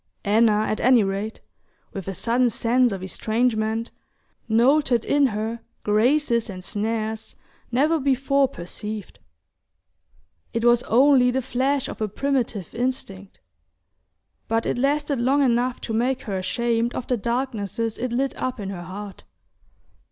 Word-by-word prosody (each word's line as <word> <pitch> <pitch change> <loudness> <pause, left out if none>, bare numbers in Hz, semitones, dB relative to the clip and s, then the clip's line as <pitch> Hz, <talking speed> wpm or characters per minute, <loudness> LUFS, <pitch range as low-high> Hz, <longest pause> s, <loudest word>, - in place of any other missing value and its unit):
Anna, 215 0 +4
at 215 - -1
any 245 -2 +5
rate, 200 +3 -3 0.5
with 195 -3 -6
a 195 - -2
sudden 240 +5 +2
sense 245 +1 +2
of 190 -2 -5
estrangement, 220 +2 -1 0.6
noted 245 +1 +3
in 285 -1 +3
her 220 +1 -3 0.2
graces 235 +2 +2
and 185 -2 -7
snares 220 +2 -3 0.4
never 300 +6 +2
before 275 0 +2
perceived. 210 +2 -7 1.3
It 230 +1 -1
was 240 0 +5
only 255 +1 +5
the 260 +1 -1
flash 265 +2 0
of - - -8
a 215 - +1
primitive 235 - -2
instinct, 200 - -4 1.1
but 225 0 0
it - - -1
lasted 285 -1 0
long 275 +4 +3
enough 245 0 +1
to 225 - -4
make 250 +4 0
her 200 - -4
ashamed 230 +5 0
of 245 - -3
the 250 - 0
darknesses 230 -2 -2
it 250 -1 -2
lit 265 +3 -1
up 255 -2 -2
in 195 -1 -4
her 180 -3 -6
heart... 195 +3 -8
235 Hz, 135 wpm, -23 LUFS, 215-255 Hz, 1.3 s, any